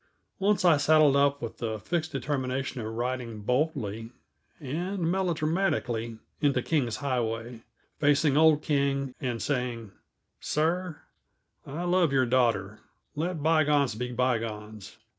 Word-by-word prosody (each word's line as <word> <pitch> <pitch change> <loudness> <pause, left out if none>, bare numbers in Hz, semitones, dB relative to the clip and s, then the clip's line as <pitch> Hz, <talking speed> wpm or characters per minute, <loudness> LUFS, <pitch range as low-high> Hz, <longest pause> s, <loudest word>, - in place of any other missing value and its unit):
Once 195 -1 +2
I 165 -4 +6
saddled 150 -1 +5
up 140 -1 +2
with 115 - -6
the 110 -2 -2
fixed 160 - -2
determination 130 -1 -2
of 110 0 -5
riding 120 -1 -3
boldly 120 -3 -1 0.5
and 170 +5 -2
melodramatically 155 -10 -1 0.2
into 140 -4 +2
King's 130 -8 0
Highway, 120 -3 -2 0.4
facing 145 0 +3
old 155 -1 +5
King, 140 -2 0
and 120 -3 -2
saying: 120 -3 -2 0.5
"Sir, 170 +2 -1 0.7
I 155 +6 -4
love 175 -3 +2
your 130 -2 +3
daughter. 115 -5 +1 0.4
Let 160 0 -2
bygones 150 -4 +3
be 125 +3 -4
bygones. 110 -4 -3
135 Hz, 120 wpm, -28 LUFS, 120-155 Hz, 0.7 s, I